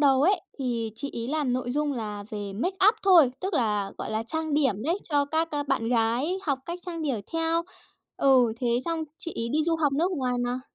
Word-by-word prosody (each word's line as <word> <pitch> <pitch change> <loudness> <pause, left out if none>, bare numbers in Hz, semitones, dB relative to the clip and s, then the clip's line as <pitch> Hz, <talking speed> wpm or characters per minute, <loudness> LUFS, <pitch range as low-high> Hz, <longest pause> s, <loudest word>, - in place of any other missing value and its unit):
đầu 270 -2 +4
ấy, 385 +6 +3 0.2
thì 235 -4 -2
chị 275 +5 -5
ấy 235 +1 -4
làm 295 -4 0
nội 245 -1 -2
dung 295 +1 0
là 210 -4 -5
về 205 -2 -5
makeup 380 - +3
thôi. 345 -9 +7
Tức 380 0 -2
là, 210 -7 0
gọi - - -4
là, 220 +1 -1
trang 315 +5 -2
điểm 265 -9 +1
đấy, 335 +8 0
cho 290 -3 +1
các, 320 +3 0
ờ, 290 -1 -1
bạn 265 -5 -1
gái 245 +10 +1
học 280 -6 0
cách 345 +1 -4
trang 335 -2 -4
điểm 260 -8 -1
theo. 330 0 +1 0.5
Ừ, 255 -4 +4
thế 245 - 0 0.2
xong 330 -1 -1
chị 335 - -5
ấy 230 0 -2
đi 305 +5 +1
du 335 -1 +1
học 295 -3 +1
nước 335 +7 +1
ngoài 255 -7 -1
mà. 250 +1 -2
280 Hz, 225 wpm, -27 LUFS, 235-325 Hz, 0.5 s, thôi